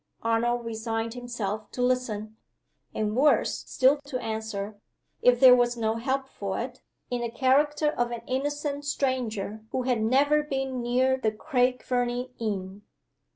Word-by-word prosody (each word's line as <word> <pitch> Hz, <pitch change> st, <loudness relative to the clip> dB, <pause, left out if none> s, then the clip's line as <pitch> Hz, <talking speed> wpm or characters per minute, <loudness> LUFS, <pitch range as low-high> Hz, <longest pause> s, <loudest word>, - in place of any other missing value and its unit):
Arnold 235 Hz, +1 st, +1 dB
resigned 225 Hz, 0 st, -3 dB
himself 230 Hz, -4 st, -4 dB
to 250 Hz, -, -3 dB
listen, 220 Hz, -4 st, -1 dB, 0.6 s
and 215 Hz, 0 st, -2 dB
worse 290 Hz, +4 st, +3 dB
still 270 Hz, +3 st, +3 dB
to 280 Hz, -3 st, -3 dB
answer, 220 Hz, -2 st, -4 dB, 0.4 s
if 245 Hz, -1 st, +5 dB
there 255 Hz, -1 st, +9 dB
was 245 Hz, -1 st, +2 dB
no 220 Hz, 0 st, 0 dB
help 265 Hz, +3 st, -1 dB
for 200 Hz, -6 st, -4 dB
it, 250 Hz, +1 st, -5 dB, 0.3 s
in 245 Hz, -1 st, -1 dB
the 235 Hz, -, -2 dB
character 285 Hz, +5 st, +2 dB
of 240 Hz, -4 st, -1 dB
an 235 Hz, -1 st, -5 dB
innocent 290 Hz, +2 st, -2 dB
stranger 235 Hz, -7 st, -2 dB
who 255 Hz, -, -2 dB
had 245 Hz, -3 st, +1 dB
never 280 Hz, +6 st, +3 dB
been 270 Hz, -3 st, -3 dB
near 255 Hz, +2 st, +2 dB
the 225 Hz, -4 st, 0 dB
Craig 250 Hz, +2 st, 0 dB
Fernie 245 Hz, 0 st, -1 dB
inn. 200 Hz, -3 st, -3 dB
245 Hz, 150 wpm, -27 LUFS, 220-260 Hz, 0.6 s, there